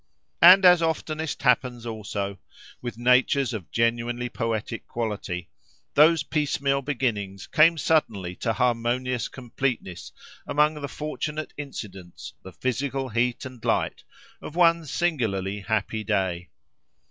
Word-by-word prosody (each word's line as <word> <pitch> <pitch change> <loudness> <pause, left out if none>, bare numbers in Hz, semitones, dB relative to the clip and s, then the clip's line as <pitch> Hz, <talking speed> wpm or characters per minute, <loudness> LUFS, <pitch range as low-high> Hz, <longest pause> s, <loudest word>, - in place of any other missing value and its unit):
And 185 +3 +9
as 180 -1 +7
oftenest 160 -2 -2
happens 125 -2 +2
also, 100 -3 -4 0.4
with 120 -2 -6
natures 125 +2 +3
of 100 -7 -6
genuinely 120 +1 0
poetic 115 -1 -3
quality, 105 -6 -4 0.5
those 155 0 +5
piecemeal 140 -2 0
beginnings 110 -9 -2
came 165 +1 +4
suddenly 105 - 0
to 115 - -1
harmonious 120 +2 0
completeness 120 -7 -4 0.4
among 150 +1 +3
the 140 - -3
fortunate 155 +1 -5
incidents, 100 -11 -8
the 95 - -11
physical 130 +5 -2
heat 120 +2 0
and 125 -3 -10
light, - - 0 0.4
of 155 - -9
one 170 -2 +4
singularly 110 - -1
happy 110 +1 -2
day. 90 -3 -1
125 Hz, 115 wpm, -25 LUFS, 110-145 Hz, 0.5 s, And